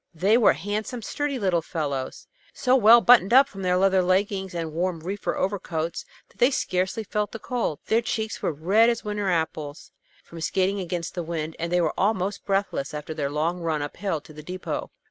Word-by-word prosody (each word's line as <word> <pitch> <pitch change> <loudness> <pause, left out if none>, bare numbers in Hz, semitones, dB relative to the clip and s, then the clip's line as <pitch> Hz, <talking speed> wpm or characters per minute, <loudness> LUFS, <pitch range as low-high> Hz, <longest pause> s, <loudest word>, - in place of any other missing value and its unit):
They 195 +7 +3
were 235 -2 +5
handsome, 210 - -4
sturdy 290 +4 -2
little 185 -7 +1
fellows, 145 -6 -4 0.3
so 255 0 +3
well 235 -1 +7
buttoned 235 -2 +6
up 275 -1 +6
in 195 - -7
their 180 -1 +2
leather 190 0 +3
leggins 190 0 0
and 165 -2 -4
warm 175 0 -1
reefer 195 +5 -3
overcoats 175 - -2 0.2
that - - -27
they 245 +1 +5
scarcely 190 -4 -1
felt 210 0 -2
the - - -4
cold. 235 - -2
Their 225 +1 +2
cheeks 220 -2 -3
were - - 0
red 195 +10 +3
as 235 -1 -1
winter 210 -2 -2
apples, 160 -3 -3 0.3
from 165 -1 -11
skating 190 +4 0
against 175 -2 -4
the 175 - -3
wind, 160 -1 -4
and 170 +1 -3
they 180 0 +3
were 160 - 0
almost 200 -1 0
breathless 195 -8 -1
after 150 +1 -5
their 145 -3 -2
long 160 +5 -1
run 160 -3 -1
up 145 - -6
hill 190 -4 -2
to 155 - -15
the 150 - -10
depot. 180 +4 -5
185 Hz, 200 wpm, -25 LUFS, 165-210 Hz, 0.3 s, well